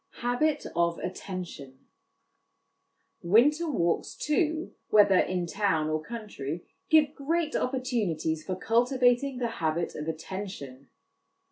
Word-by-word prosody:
Habit 285 Hz, +5 st, +1 dB
of 170 Hz, 0 st, +2 dB
Attention. 180 Hz, -8 st, -6 dB, 1.4 s
Winter 285 Hz, -, +4 dB
walks, 170 Hz, -, 0 dB
too, 315 Hz, +1 st, 0 dB, 0.2 s
whether 205 Hz, -3 st, +6 dB
in 180 Hz, -1 st, 0 dB
town 170 Hz, -5 st, 0 dB
or 155 Hz, 0 st, 0 dB
country, 175 Hz, -, -6 dB, 0.2 s
give 305 Hz, -2 st, +5 dB
great 315 Hz, +2 st, -1 dB
opportunities 210 Hz, -, -1 dB
for 185 Hz, -, -3 dB
cultivating 245 Hz, +5 st, +2 dB
the 245 Hz, -1 st, 0 dB
habit 165 Hz, +1 st, 0 dB
of 150 Hz, +1 st, -6 dB
attention. 160 Hz, -5 st, -6 dB
200 Hz, 105 wpm, -28 LUFS, 165-260 Hz, 1.4 s, whether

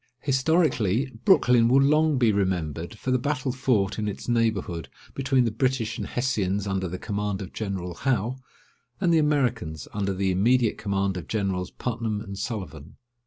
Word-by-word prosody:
Historically, 135 Hz, -, +1 dB
Brooklyn 120 Hz, -2 st, +5 dB
will 130 Hz, +3 st, +5 dB
long 150 Hz, +1 st, +3 dB
be 120 Hz, -3 st, +4 dB
remembered 90 Hz, -2 st, -2 dB
for 130 Hz, -, -3 dB
the 130 Hz, -, +3 dB
battle 140 Hz, 0 st, -1 dB
fought 110 Hz, -6 st, 0 dB
in 105 Hz, -, -1 dB
its 100 Hz, -, -5 dB
neighbourhood 110 Hz, -8 st, 0 dB, 0.2 s
between 135 Hz, -2 st, +2 dB
the 115 Hz, -, 0 dB
British 120 Hz, -1 st, -1 dB
and -, -, -4 dB
Hessians 105 Hz, -6 st, -1 dB
under 95 Hz, -1 st, -1 dB
the 90 Hz, +2 st, -5 dB
command 105 Hz, -1 st, -3 dB
of 95 Hz, -, -7 dB
General 95 Hz, -4 st, -4 dB
Howe, 125 Hz, +3 st, -1 dB, 0.6 s
and 175 Hz, -3 st, +2 dB
the 165 Hz, -, +5 dB
Americans 125 Hz, -, 0 dB
under 100 Hz, -2 st, -1 dB
the 95 Hz, 0 st, 0 dB
immediate 115 Hz, +5 st, +2 dB
command 95 Hz, -2 st, -1 dB
of 85 Hz, -, -7 dB
Generals 95 Hz, -4 st, -1 dB
Putnam 115 Hz, -3 st, -3 dB
and 100 Hz, -2 st, -7 dB
Sullivan. 95 Hz, -, -6 dB
110 Hz, 165 wpm, -25 LUFS, 95-130 Hz, 0.6 s, Brooklyn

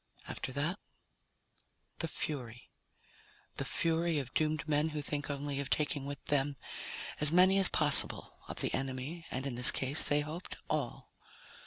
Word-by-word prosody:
After -, -, -6 dB
that, 160 Hz, +8 st, -2 dB, 1.2 s
the 165 Hz, -, -3 dB
Fury. 125 Hz, -7 st, -6 dB, 0.9 s
The -, -, -4 dB
Fury 165 Hz, 0 st, -1 dB
of 130 Hz, -4 st, -5 dB
doomed 155 Hz, -1 st, -2 dB
men 150 Hz, +1 st, 0 dB
who 150 Hz, -1 st, -5 dB
think 145 Hz, 0 st, -5 dB
only 140 Hz, 0 st, -5 dB
of 140 Hz, -, -5 dB
taking 145 Hz, -2 st, -1 dB
with 145 Hz, -1 st, -9 dB
them 145 Hz, -1 st, -1 dB, 0.6 s
as 150 Hz, 0 st, +12 dB
many 185 Hz, +3 st, +4 dB
as 190 Hz, -, +6 dB
possible 145 Hz, -2 st, +3 dB
of -, -, -6 dB
the -, -, -2 dB
enemy, 135 Hz, +5 st, -5 dB
and 130 Hz, +1 st, -5 dB
in 135 Hz, -, -4 dB
this 125 Hz, +1 st, +4 dB
case 135 Hz, +3 st, +3 dB
they 145 Hz, 0 st, +2 dB
hoped 155 Hz, +4 st, -8 dB
all. -, -, -5 dB
145 Hz, 155 wpm, -31 LUFS, 135-155 Hz, 1.2 s, as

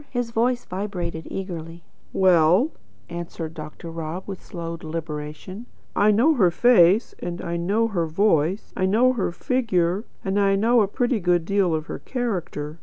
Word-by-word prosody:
His 245 Hz, -2 st, -2 dB
voice 240 Hz, +2 st, +1 dB
vibrated 180 Hz, -4 st, -4 dB
eagerly. 170 Hz, -3 st, -6 dB, 0.3 s
"Well," 185 Hz, -, +4 dB, 0.4 s
answered 170 Hz, -2 st, -6 dB
Dr. 155 Hz, +1 st, -8 dB
Rob, 165 Hz, +2 st, -5 dB
with 195 Hz, -2 st, -7 dB
slow 170 Hz, -1 st, -6 dB
deliberation, 160 Hz, +5 st, -6 dB, 0.3 s
"I 205 Hz, -, +4 dB
know 235 Hz, +10 st, +4 dB
her 200 Hz, -, +4 dB
face, 205 Hz, +1 st, +4 dB
and 175 Hz, 0 st, -5 dB
I 170 Hz, -, -4 dB
know 200 Hz, +7 st, +1 dB
her 170 Hz, -6 st, -1 dB
voice; 170 Hz, +1 st, +1 dB
I 185 Hz, -, +1 dB
know 240 Hz, +6 st, +4 dB
her 215 Hz, -8 st, -1 dB
figure, 195 Hz, -4 st, 0 dB, 0.2 s
and 195 Hz, +1 st, +1 dB
I 195 Hz, -1 st, +3 dB
know 230 Hz, +4 st, +4 dB
a 205 Hz, -, +2 dB
pretty 245 Hz, +3 st, 0 dB
good 175 Hz, -2 st, +1 dB
deal 195 Hz, -3 st, +2 dB
of 155 Hz, 0 st, -3 dB
her -, -, -6 dB
character. 175 Hz, -, -4 dB
185 Hz, 160 wpm, -23 LUFS, 165-215 Hz, 0.4 s, Well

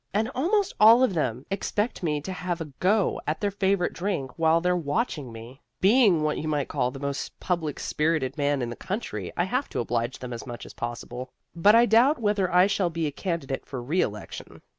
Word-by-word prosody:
And 220 Hz, +3 st, +1 dB
almost 380 Hz, -, +1 dB
all 230 Hz, +4 st, +8 dB
of 255 Hz, -, +2 dB
them 130 Hz, -6 st, -2 dB
expect 205 Hz, +3 st, -2 dB
me 150 Hz, -4 st, -1 dB
to 185 Hz, +5 st, -5 dB
have 180 Hz, -1 st, -3 dB
a 165 Hz, -, -4 dB
go 200 Hz, +1 st, +2 dB
at 155 Hz, -, -1 dB
their 205 Hz, -1 st, 0 dB
favorite 195 Hz, -2 st, +1 dB
drink 175 Hz, -9 st, -3 dB
while 165 Hz, 0 st, +4 dB
they're 180 Hz, +1 st, +1 dB
watching 155 Hz, -, -2 dB
me. 115 Hz, +4 st, -11 dB, 0.2 s
Being 200 Hz, -6 st, +4 dB
what 155 Hz, 0 st, 0 dB
you 155 Hz, -, -4 dB
might 145 Hz, -3 st, -1 dB
call 125 Hz, -4 st, 0 dB
the 135 Hz, +1 st, -9 dB
most 140 Hz, -1 st, -4 dB
public 165 Hz, -5 st, -2 dB
spirited 150 Hz, -4 st, 0 dB
man 145 Hz, -3 st, 0 dB
in 120 Hz, -, -3 dB
the -, -, -6 dB
country, 115 Hz, -, -5 dB
I 175 Hz, -, +3 dB
have 250 Hz, +9 st, -1 dB
to -, -, -3 dB
oblige 120 Hz, +1 st, -1 dB
them 125 Hz, -1 st, -7 dB
as 120 Hz, +3 st, -7 dB
much 120 Hz, -1 st, -7 dB
as -, -, -11 dB
possible. 120 Hz, +2 st, -6 dB, 0.3 s
But 200 Hz, +6 st, +5 dB
I 235 Hz, +1 st, +7 dB
doubt 240 Hz, +7 st, +4 dB
whether 205 Hz, -4 st, +1 dB
I 180 Hz, +1 st, +6 dB
shall 195 Hz, -3 st, +1 dB
be 165 Hz, -1 st, -2 dB
a 150 Hz, -, -1 dB
candidate 155 Hz, -5 st, -4 dB
for 130 Hz, -, -5 dB
reelection. 120 Hz, -, -3 dB
165 Hz, 210 wpm, -26 LUFS, 135-200 Hz, 0.3 s, all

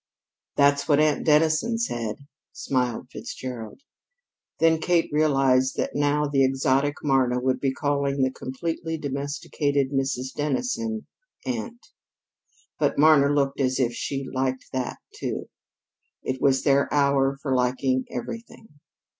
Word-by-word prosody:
"That's 140 Hz, 0 st, +3 dB
what 145 Hz, -2 st, +4 dB
Aunt 155 Hz, -1 st, +2 dB
Dennison 155 Hz, +9 st, +3 dB
said," 120 Hz, -, -3 dB, 0.3 s
smiled 125 Hz, -2 st, -2 dB
Fitzgerald. 125 Hz, -, -7 dB, 0.8 s
Then 165 Hz, -1 st, +4 dB
Kate 175 Hz, -2 st, +1 dB
realized 135 Hz, -4 st, +3 dB
that -, -, -1 dB
now 145 Hz, +1 st, +1 dB
the 140 Hz, -2 st, +2 dB
exotic 135 Hz, +2 st, +2 dB
Marna 130 Hz, -3 st, +2 dB
would 130 Hz, 0 st, 0 dB
be 135 Hz, 0 st, +1 dB
calling 140 Hz, 0 st, -1 dB
the 130 Hz, -, +1 dB
completely 160 Hz, +5 st, -4 dB
domesticated 145 Hz, -1 st, -2 dB
Mrs. 135 Hz, -1 st, -1 dB
Dennison 220 Hz, -, -2 dB, 0.4 s
"aunt." 240 Hz, -1 st, -4 dB, 0.9 s
But -, -, +1 dB
Marna 145 Hz, -2 st, +6 dB
looked 140 Hz, -1 st, 0 dB
as 130 Hz, 0 st, +1 dB
if 120 Hz, -2 st, +1 dB
she 135 Hz, +2 st, -3 dB
liked 130 Hz, 0 st, -2 dB
that, 130 Hz, -1 st, -2 dB, 0.2 s
too. -, -, -4 dB, 0.7 s
It 130 Hz, 0 st, -3 dB
was 135 Hz, -1 st, +3 dB
their 140 Hz, -1 st, +3 dB
hour 140 Hz, -1 st, +2 dB
for 135 Hz, -1 st, -2 dB
liking 130 Hz, +1 st, +1 dB
everything. 230 Hz, -8 st, -8 dB
140 Hz, 125 wpm, -25 LUFS, 130-150 Hz, 0.9 s, Marna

